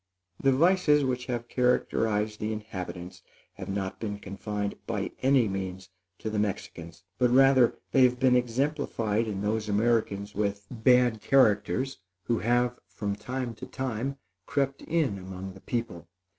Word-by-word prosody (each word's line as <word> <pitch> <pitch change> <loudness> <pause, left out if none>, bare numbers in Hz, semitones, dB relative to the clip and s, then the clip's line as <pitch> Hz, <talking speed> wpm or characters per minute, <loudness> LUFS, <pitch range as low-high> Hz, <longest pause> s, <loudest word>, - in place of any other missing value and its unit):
The 135 - +4
vices 150 0 +4
which 125 -1 -2
have 120 -2 -3
characterized 110 -4 +1
the 105 +1 -2
inhabitants 95 -4 -6 0.3
have - - -8
not 95 -1 -3
been 105 -2 -3
confined, 100 0 -4
by - - -2
any 130 -3 +4
means, 95 -1 -5 0.3
to 110 - -4
the 105 - -1
Mexicans; 90 -4 -4 0.2
but 125 -1 +4
rather 130 -1 +5 0.2
they 135 - +4
have 125 0 +1
been 130 -1 +4
exemplified 125 -3 0
in 100 -2 -3
those 105 0 -1
Americans 105 -2 +1
with 100 0 -2
bad 125 -1 +3
characters, 130 +1 +2 0.2
who 115 +2 0
have, 120 +1 +1
from 100 -2 -3
time 125 +2 -4
to - - -9
time, 130 +1 -3 0.3
crept 140 -1 -1
in 155 -12 0
among 95 0 -7
the 95 - -14
people. 115 -9 -4
115 Hz, 145 wpm, -28 LUFS, 100-130 Hz, 0.3 s, rather